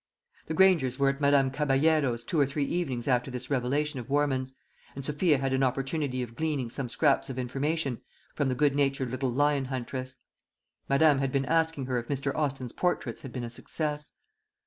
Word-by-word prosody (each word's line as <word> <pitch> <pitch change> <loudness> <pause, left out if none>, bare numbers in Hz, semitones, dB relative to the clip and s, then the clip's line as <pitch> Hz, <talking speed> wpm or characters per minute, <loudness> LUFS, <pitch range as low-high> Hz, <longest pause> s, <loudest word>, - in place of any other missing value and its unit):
The 160 - -2
Grangers 165 -9 +4
were 140 -1 +3
at 135 +1 -3
Madame 140 -2 +4
Caballero's 140 -3 +2
two 155 +6 -1
or 140 - +4
three 140 +1 -1
evenings 135 -8 -2
after 125 0 +2
this 125 +1 -6
revelation 140 +2 0
of 125 +1 -8
Warman's, 135 -2 +1 0.4
and 135 -1 -5
Sophia 150 +1 +2
had 135 0 -1
an 130 - +1
opportunity 135 0 -1
of 120 -1 -8
gleaning 145 -6 -2
some 130 -1 -4
scraps 140 +2 +2
of 130 - -5
information 135 +2 -2 0.3
from 145 -3 0
the 130 - 0
good 145 +1 +3
natured 135 -3 0
little 130 0 -1
lion 145 +1 +2
huntress. 130 0 -5 0.7
Madame 140 0 +5
had 135 -1 0
been 135 0 0
asking 160 -3 +1
her 125 -1 0
if 120 - -8
Mr. 140 -1 -1
Austin's 135 -5 -2
portraits 180 -1 -1
had 135 - -8
been 125 -1 -5
a 120 - -4
success. 150 +4 -4
135 Hz, 190 wpm, -28 LUFS, 130-150 Hz, 0.7 s, Madame